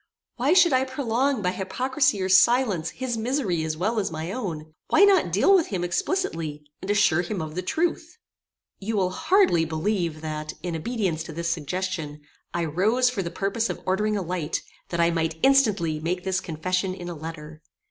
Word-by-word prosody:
Why 265 +6 +3
should 350 -4 +5
I 260 0 +4
prolong, 260 -2 -1
by 180 - +1
hypocrisy 255 +5 0
or - - 0
silence, 190 -3 +4
his 250 -3 -4
misery 220 - -1
as 155 0 -3
well 215 +6 0
as 200 - -1
my 160 +2 -5
own? 160 -9 -5
Why - - +5
not 385 - +4
deal 205 - +4
with 360 -4 +4
him 185 -4 -3
explicitly, 170 - -2 0.2
and 190 - -7
assure 195 -5 +3
him 185 +2 -4
of 155 -2 -5
the 180 - -2
truth? 335 - -2 0.6
You 215 +2 -2
will 185 -2 +1
hardly 335 - +3
believe 165 0 -2
that, 155 -1 -5
in 175 -2 -3
obedience 185 -2 -2
to 160 - -8
this 170 +1 -2
suggestion, 165 -2 -3 0.3
I 175 -1 -1
rose 215 +11 +2
for 220 -6 -2
the 170 - -4
purpose 200 +6 -1
of - - -4
ordering 210 +3 +1
a 195 - -2
light, 170 -3 -3 0.3
that 170 - -3
I 170 0 +4
might 160 -1 -1
instantly 210 - +3
make 175 +3 -2
this 190 0 0
confession 185 +3 -2
in 175 -2 -8
a 175 - -4
letter. 155 -1 -8
185 Hz, 190 wpm, -25 LUFS, 165-235 Hz, 0.6 s, should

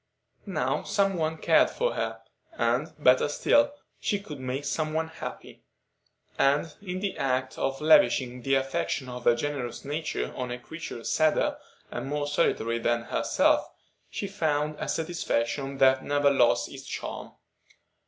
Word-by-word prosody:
Now - - 0
some 195 -1 +1
one 160 -1 -1
cared - - +4
for - - -1
her, - - -3 0.3
and, - - 0
better - - +4
still, 285 0 +3 0.3
she 205 - 0
could 150 -8 -9
make 130 +2 -3
some 155 +2 -1
one 160 0 -1
happy, 160 - -8 0.8
and 145 +3 +2
in 185 -2 -5
the 200 -2 -2
act 130 -1 0
of 135 0 -1
lavishing 150 -7 +4
the 135 +2 +2
affection 135 0 -1
of 125 -1 -7
her 120 - +6
generous 130 -2 -4
nature 155 +2 -3
on 125 -1 -3
a 125 - -3
creature 125 -3 -8
sadder 155 +4 +2 0.3
and - - -4
more 145 +1 -1
solitary 115 -6 +1
than 120 0 +1
herself, - - +2 0.4
she 200 - -4
found 150 -6 0
a - - -3
satisfaction 140 -5 -1
that 130 0 +4
never 145 0 +3
lost 125 -4 +3
its - - -9
charm. - - -6
145 Hz, 150 wpm, -27 LUFS, 130-160 Hz, 0.8 s, her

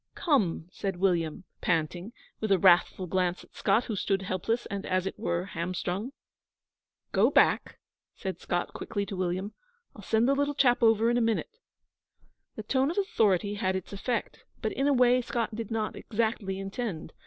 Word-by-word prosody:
'Come!' 205 - +1
said 195 -2 -3
William, 175 -3 0 0.2
panting, 175 +4 -1 0.3
with 215 -2 -2
a 195 - +6
wrathful 185 0 +4
glance 180 0 0
at - - -21
Scott, 205 +5 +2
who 220 - -4
stood 195 0 0
helpless 195 +6 -1
and, 200 0 -4
as 185 0 0
it 195 - -2
were, 175 -4 -1
hamstrung. 185 +5 -3 1.0
'Go - - +4
back,' - - +3 0.4
said - - -5
Scott - - -2
quickly 205 -2 -3
to 200 - -6
William. 185 +3 -2 0.4
'I'll 210 - -10
send 220 +4 +2
the 275 - +4
little 285 +1 0
chap 250 -3 +3
over 225 0 +4
in 240 - +2
a - - +2
minute.' 230 - -1 1.0
The 215 - -6
tone 265 +5 +1
of 340 - -4
authority 205 - +2
had 190 -2 -1
its 190 +1 -5
effect, 230 +4 -3 0.2
but 220 - -2
in 270 +2 0
a 285 - +4
way 250 -1 +4
Scott 235 -2 -2
did 225 -1 -5
not 220 -2 -2
exactly 220 -3 -2
intend. 195 -4 -5
205 Hz, 175 wpm, -28 LUFS, 185-235 Hz, 1.0 s, a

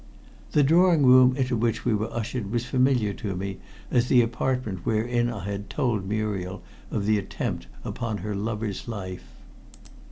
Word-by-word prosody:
The 150 - +5
drawing 165 0 +5
room 130 0 +7
into 130 -2 0
which 115 0 0
we 120 - +2
were 110 +1 -1
ushered 120 -2 -3
was 120 0 -1
familiar 125 -6 +2
to 100 -2 -4
me 95 +1 -4 0.3
as 125 -1 +3
the 125 -2 +5
apartment 115 -4 -2
wherein 120 +2 +1
I 110 -6 -5
had 100 0 -4
told 105 -7 -1
Muriel 100 -4 -2 0.3
of 100 - -2
the 105 0 +3
attempt 95 -9 -4 0.2
upon 115 -3 -3
her 105 +1 -4
lover's 105 0 -3
life. 95 -5 -6
110 Hz, 160 wpm, -26 LUFS, 100-125 Hz, 0.3 s, room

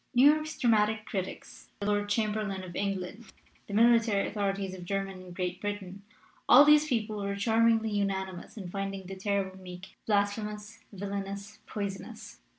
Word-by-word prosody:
''New 255 - +7
York's 310 +1 -4
dramatic 220 -3 +2
critics, 190 -3 -6
the 200 - -3
Lord 205 0 +1
Cham 215 0 +1
berlain 200 -3 -3
of 175 -2 -9
England, 200 +2 -3 0.4
the 200 - -7
military 230 -2 +4
authorities 200 -2 -2
of 185 -1 -8
Germany 195 0 -3
and 180 -1 -11
Great 180 0 -3
Britain 205 -2 -5 0.5
all 280 +4 +10
these 300 +1 +6
people 220 -5 -1
were 200 0 -2
charmingly 225 +1 +3
unanimous 190 -1 -2
in 195 -4 -6
finding 195 +1 -4
The 190 +1 -7
Terrible 190 -1 -2
Meek 180 0 -10
blasphemous, 210 +1 -1
villainous, 200 +1 -5
poisonous. 200 -2 -6
200 Hz, 155 wpm, -30 LUFS, 195-215 Hz, 0.5 s, all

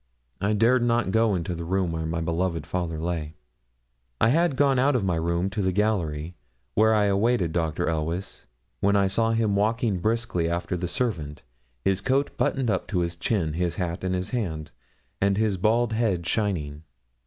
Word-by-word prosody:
I 100 +2 +1
dared 115 +4 +4
not 120 -4 +1
go 110 -1 +3
into 90 0 -2
the 85 0 -5
room 90 0 0
where 80 -1 -3
my 80 +1 -2
beloved 85 +1 -1
father 85 -3 -3
lay. 80 -2 -3 0.8
I 115 - +4
had 165 +2 +2
gone 135 -2 +3
out 135 +2 +3
of 120 - +1
my 95 -2 +1
room 85 +2 0
to 105 - -2
the 95 -1 +1
gallery, 90 -6 -1 0.4
where 110 +1 +4
I 105 -1 +3
awaited 100 -2 +2
Dr. 80 -3 0
Elweys, 80 +4 -3 0.3
when 100 +1 +2
I 100 -1 +4
saw 115 +4 +1
him 110 -3 +1
walking 110 -1 +1
briskly 110 -4 0
after 85 +2 -2
the 90 0 -2
servant, 85 - -3 0.4
his 95 0 +2
coat 135 +6 0
buttoned 130 -5 0
up 95 - -1
to 90 -5 0
his 85 0 -2
chin, 85 -4 -1
his 85 +1 -1
hat 90 -1 -3
in 95 0 0
his 90 +2 -2
hand, 80 -11 -3 0.5
and 100 0 +2
his 105 -3 +1
bald 115 +4 +2
head 105 -7 0
shining. 85 -9 -1
95 Hz, 185 wpm, -25 LUFS, 85-110 Hz, 0.8 s, dared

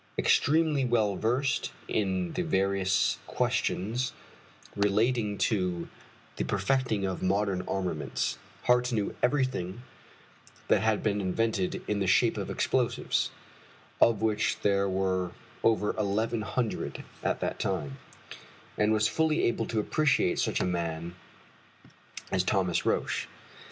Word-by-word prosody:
Extremely 155 -1 +3
well 110 -5 +2
versed 125 +8 0 0.2
in 95 -4 -1
the 180 - -1
various 95 - +1
questions 115 +7 -1 0.6
relating 105 +1 +1
to 90 -6 0 0.5
the - - 0
perfecting 125 -7 0
of 95 -1 -3
modern 95 0 +1
armaments, 90 -8 -2 0.2
Hart 125 0 +3
knew 105 -4 -1
everything 125 -6 0 0.9
that - - +4
had 110 -1 +1
been 105 -2 +1
invented 95 0 -1
in 105 - 0
the 95 - 0
shape 110 +5 +4
of - - -4
explosives, - - 0 0.7
of 110 -2 +4
which 110 -1 +1
there 100 -1 +2
were 95 -1 0 0.3
over 110 -2 +2
eleven 110 +2 0
hundred 115 +1 -3 0.2
at - - 0
that - - -2
time, 70 -2 -2 0.8
and 105 +1 +3
was 110 0 +3
fully 160 +4 +1
able 115 -1 +1
to 110 - -1
appreciate 135 -4 +2
such - - +1
a - - +1
man 85 -1 -2 1.2
as 95 -1 +2
Thomas 95 -2 +1
Roch. - - 0
105 Hz, 120 wpm, -29 LUFS, 95-120 Hz, 1.2 s, that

